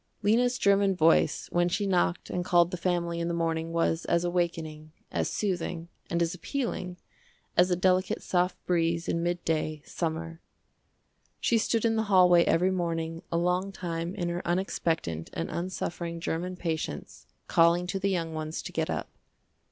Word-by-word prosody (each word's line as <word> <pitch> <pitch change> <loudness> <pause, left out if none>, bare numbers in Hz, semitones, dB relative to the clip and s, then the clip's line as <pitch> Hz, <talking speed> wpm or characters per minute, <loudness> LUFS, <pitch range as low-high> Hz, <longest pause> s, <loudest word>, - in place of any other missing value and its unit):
Lena's 245 +4 +3
german 200 -2 +3
voice 165 -1 +3
when 175 0 +2
she 200 +4 0
knocked 180 -2 0
and 180 - -1
called 175 -1 +4
the - - -2
family 170 -1 -1
in 170 - -1
the 170 - -1
morning 165 -1 -1
was 165 0 +1
as 170 0 +2
awakening, 165 -3 -2 0.2
as - - 0
soothing, 175 -4 -2 0.2
and 170 0 +1
as 170 - -1
appealing, 180 -3 -3 0.6
as 180 +1 +5
a 180 - +3
delicate 185 +1 +1
soft 180 0 +1
breeze 170 -1 +1
in 170 - 0
midday, 165 -3 -1
summer. 165 0 -4 1.0
She 230 - +2
stood 225 +1 +1
in 225 -1 +2
the 220 - +2
hallway 180 -3 +6
every 180 +3 +3
morning 165 -2 -2
a 170 - +1
long 180 +3 +1
time 170 -1 -4
in 175 -4 -2
her 175 +1 -2
unexpectant 165 - -1
and 80 - -3
unsuffering 170 -1 -4
german 175 +2 -3
patience 160 - -4 0.2
calling 170 +1 +4
to 185 +2 -2
the 200 +1 +1
young 165 -4 -1
ones 155 0 -4
to - - -6
get - - -1
up. - - -2
175 Hz, 165 wpm, -28 LUFS, 165-185 Hz, 1.0 s, hallway